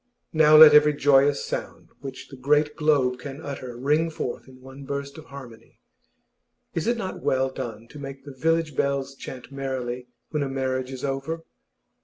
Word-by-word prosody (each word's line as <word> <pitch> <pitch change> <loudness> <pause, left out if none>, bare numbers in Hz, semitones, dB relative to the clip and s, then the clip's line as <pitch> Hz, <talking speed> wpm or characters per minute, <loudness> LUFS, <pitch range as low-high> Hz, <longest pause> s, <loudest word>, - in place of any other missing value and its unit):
Now 155 -1 +6
let 155 -1 +11
every 150 0 +6
joyous 140 -3 +3
sound - - -6
which 135 -2 -9
the 135 - -10
great 150 +3 +1
globe 140 -5 +2
can 140 +2 -8
utter 130 -5 -7
ring 150 +6 +1
forth 130 -6 -5
in 130 -1 -15
one 135 +2 -12
burst 140 0 -5
of 155 - -13
harmony! 130 -6 -12 1.0
Is 165 - -2
it 240 0 +2
not 190 -5 -5
well 130 0 +1
done 115 -3 -7
to 150 - -11
make 135 -1 -8
the 140 - -9
village 160 +2 0
bells 140 0 -1
chant 130 -1 -10
merrily 130 -2 -4 0.2
when 150 - -1
a 140 - -1
marriage 130 -1 -2
is 130 0 -5
over? 140 +4 -3
140 Hz, 175 wpm, -25 LUFS, 130-150 Hz, 1.0 s, let